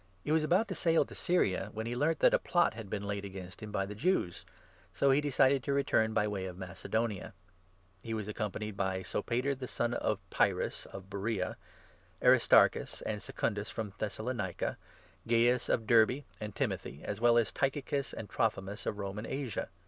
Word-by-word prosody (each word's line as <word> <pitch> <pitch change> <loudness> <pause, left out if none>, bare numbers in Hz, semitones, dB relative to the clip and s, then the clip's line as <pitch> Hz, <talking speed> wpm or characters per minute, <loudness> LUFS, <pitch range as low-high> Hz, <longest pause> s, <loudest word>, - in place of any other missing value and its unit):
He 150 - -2
was 160 0 +3
about 185 +8 +3
to - - -1
sail 165 -3 +3
to - - -12
3 - - -10
Syria, 100 - +1
when 110 +1 -4
he 120 +1 -3
learnt 155 +5 +2
that - - +6
a - - +5
plot 175 -8 +2
had 110 -3 -8
been 100 0 -3
laid 100 0 -3
against 95 -2 -8
him 105 -1 -7
by 100 -2 0
the 100 - -6
Jews; 125 - 0 0.5
so 140 - +4
he 135 +2 +4
decided 135 -1 +3
to 140 - -1
return 110 -5 +2
by 105 -1 +2
way 100 -2 -3
of 90 -1 -6
Mace 90 -1 -8
donia. 110 -2 -1 0.7
He 115 +2 -4
was 105 -2 -4
accompanied 105 -1 -3
by 95 -1 -1
Sopater 125 +8 -1
the 130 -1 -6
son 120 0 -1
of 110 - 0
Pyrrhus, - - +1
4 - - -18
of 95 0 -9
Beroea, 100 -1 -2 0.6
Aristarchus - - +4
and 105 -1 -3
Secundus 105 -2 -2
from 105 -3 -5
Thessalonica, 110 -3 -2 0.5
Gaius 120 +1 +3
of 115 - +1
Derbe, 115 +5 +4 0.2
and 105 -1 -6
Timothy, 70 - -3
as 105 +1 -4
well 120 0 +5
as 115 -2 +2
by - - -13
Tychicus 140 0 -3
and 110 - -6
Trophimus 105 -4 -1
of 105 - -1
Roman 100 +2 -4
Asia. 135 -6 -3
110 Hz, 195 wpm, -32 LUFS, 100-130 Hz, 0.7 s, that